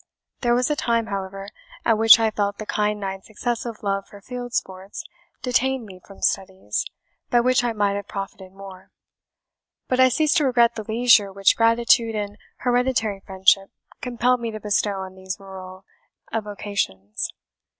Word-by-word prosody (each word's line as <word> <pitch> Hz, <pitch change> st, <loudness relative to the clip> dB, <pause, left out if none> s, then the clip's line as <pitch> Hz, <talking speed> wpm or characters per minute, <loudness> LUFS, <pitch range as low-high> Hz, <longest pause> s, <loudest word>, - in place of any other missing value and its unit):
There 240 Hz, -1 st, +2 dB
was 250 Hz, +4 st, +1 dB
a -, -, +2 dB
time, 230 Hz, -4 st, +1 dB
however, 195 Hz, -1 st, -5 dB, 0.4 s
at 225 Hz, -, +4 dB
which 225 Hz, +1 st, +8 dB
I 225 Hz, -1 st, +2 dB
felt 205 Hz, -1 st, -1 dB
the 215 Hz, -, -6 dB
kind 210 Hz, 0 st, 0 dB
knight's 195 Hz, 0 st, -5 dB
excessive 230 Hz, 0 st, -3 dB
love 195 Hz, -1 st, -1 dB
for 205 Hz, -, -13 dB
field 245 Hz, +3 st, -7 dB
sports 190 Hz, -, -4 dB, 0.4 s
detained 255 Hz, 0 st, +1 dB
me 185 Hz, -3 st, -12 dB
from 195 Hz, -, -14 dB
studies, 190 Hz, -, -1 dB, 0.4 s
by 240 Hz, -, +4 dB
which 250 Hz, +1 st, +3 dB
I 240 Hz, -, +1 dB
might 205 Hz, -2 st, +1 dB
have 200 Hz, 0 st, -4 dB
profited 195 Hz, -1 st, -7 dB
more; 195 Hz, -1 st, -12 dB, 1.0 s
but 255 Hz, -, 0 dB
I 260 Hz, 0 st, +7 dB
ceased 305 Hz, +4 st, +2 dB
to 300 Hz, -, +3 dB
regret 240 Hz, -3 st, +4 dB
the 220 Hz, -, -6 dB
leisure 225 Hz, -3 st, +5 dB
which 195 Hz, 0 st, +3 dB
gratitude 230 Hz, 0 st, +3 dB
and 205 Hz, 0 st, -4 dB, 0.2 s
hereditary 245 Hz, -5 st, +1 dB
friendship 190 Hz, 0 st, +2 dB, 0.3 s
compelled 250 Hz, 0 st, +1 dB
me 235 Hz, -1 st, -3 dB
to 215 Hz, -1 st, -6 dB
bestow 205 Hz, -1 st, 0 dB
on 190 Hz, 0 st, -7 dB
these 190 Hz, +1 st, -6 dB
rural 185 Hz, -1 st, -10 dB, 0.5 s
avocations. 200 Hz, -, -3 dB
210 Hz, 160 wpm, -23 LUFS, 195-240 Hz, 1.0 s, which